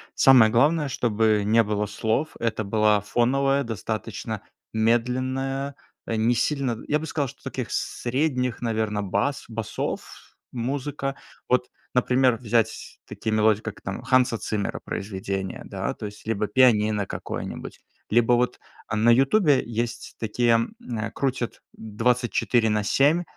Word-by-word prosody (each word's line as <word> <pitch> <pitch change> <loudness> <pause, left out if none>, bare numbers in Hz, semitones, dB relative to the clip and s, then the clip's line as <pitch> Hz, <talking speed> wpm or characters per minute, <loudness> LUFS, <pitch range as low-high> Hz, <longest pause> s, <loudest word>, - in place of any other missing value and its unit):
Самое 125 -5 +7
главное, 150 +6 +3
чтобы 110 -4 +1
не 115 +2 +4
было 105 0 -1
слов. 110 +9 -1
Это 115 -2 -1
была 105 0 +3
фоновая, 135 +6 +2
достаточно 110 -2 -4 0.3
медленная, 130 +4 0 0.3
а, 115 - -2
не 115 +2 +2
сильно 130 -1 0
Я 150 - +2
бы 160 - -5
сказал, 145 -3 -1
что - - -13
таких - - -5
средних, 125 -1 -1
наверно, 110 -3 -1
бас 140 +9 -1
басов, 115 -2 -5 0.2
музыка. 135 +3 -3 0.3
Вот, 125 0 +1 0.3
например, 125 0 +3
взять 115 -1 -1
такие 110 - -4
мелодии, 110 0 +3
как 110 -2 -7
там 100 - -5
Ханса 125 -3 +3
Циммера 105 -2 -3
произведения, 95 -1 -4
да, - - -3
то - - -8
есть 105 0 -12
либо 105 -1 0
пианино 105 -3 +3
какое-нибудь, - - -6 0.3
либо 120 +2 +4
вот, 125 +1 +1 0.3
а, 105 - -2
на 110 +2 +4
"Ютубе" 135 - +4
есть 120 +1 -4
такие, 115 +2 +1
эм, 115 - -3
крутят 130 -3 -2
24/7, 120 +5 +1
120 Hz, 130 wpm, -25 LUFS, 110-130 Hz, 0.3 s, Самое